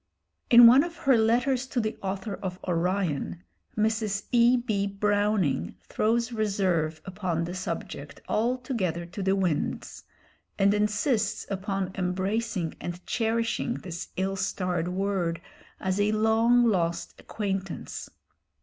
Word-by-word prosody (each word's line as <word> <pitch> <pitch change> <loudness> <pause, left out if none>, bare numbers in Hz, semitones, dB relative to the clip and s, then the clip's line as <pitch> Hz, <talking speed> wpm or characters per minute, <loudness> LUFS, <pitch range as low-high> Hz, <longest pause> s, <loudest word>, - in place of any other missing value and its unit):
In 240 0 +10
one 255 +5 +8
of 340 0 -6
her 270 -2 +3
"Letters 245 +4 +2
to 255 - -1
the 215 -1 -1
Author 195 +1 -3
of 185 -2 -5
Orion," 175 -1 -1 0.3
Mrs. 215 -2 0
E. 240 +1 +5
B. 215 -5 -1
Browning 200 - 0
throws 230 +2 0
reserve 190 -8 0
upon 185 -3 -2
the 175 +1 -4
subject 185 - -5
altogether 225 - -1
to 180 +4 -7
the 190 0 +2
winds, 180 -6 -2 0.5
and 200 0 +4
insists 210 +1 0
upon 195 -1 -2
embracing 190 0 -1
and 175 +1 -6
cherishing 230 +1 0
this 175 -2 -6
ill 195 +1 -1
starred 180 -3 -1
word 180 -2 -1 0.4
as 190 +1 -1
a 205 +1 +2
long 225 +3 +4
lost 170 -6 0
acquaintance. 195 -3 -4
200 Hz, 120 wpm, -27 LUFS, 185-225 Hz, 0.5 s, In